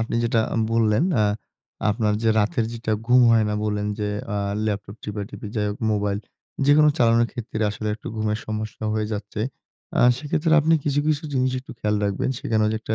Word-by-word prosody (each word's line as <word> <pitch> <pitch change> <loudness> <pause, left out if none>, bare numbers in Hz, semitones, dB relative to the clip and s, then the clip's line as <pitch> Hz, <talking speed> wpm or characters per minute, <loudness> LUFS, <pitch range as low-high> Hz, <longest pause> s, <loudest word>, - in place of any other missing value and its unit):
আপনি 115 - -2
যেটা 115 -1 +2
আ - - -1 0.2
বললেন 115 +4 +3 0.2
আ - - +4 0.7
আপনার 105 0 +1
যে 115 - +2
রাতের 110 +2 +1
যেটা 115 -2 -3
ঘুম 125 +1 +6
হয় 115 -1 +4
না - - -1
বললেন 105 -1 -1
যে, 105 -1 -1 0.3
আ - - -1 0.3
ল্যাপটপ 100 0 -3
টিপাটিপি 105 +1 -6
যাই 105 - +1
হোক, 105 - -5
মোবাইল 100 -1 0 0.5
যেকোনো 150 +1 +6
চালানোর 115 -1 +4
ক্ষেত্রে 115 -3 -4
আসলে 105 +1 -4
একটু 110 - -13
ঘুমের 110 0 -1
সমস্যা 110 0 -4
হয়ে 110 -1 0
যাচ্ছে। 105 0 -5 0.6
আ - - +1 0.2
সেক্ষেত্রে 150 +3 0
আপনি 160 +2 +3
কিছু, 145 0 +1
কিছু 155 +1 +1
জিনিস 130 -1 +1
একটু 130 - -11
খেয়াল 105 -2 0
রাখবেন। 100 +5 -1
সেখানে 110 -1 0
যে, - - 0
একটা 110 - -2
110 Hz, 190 wpm, -23 LUFS, 105-120 Hz, 0.7 s, ঘুম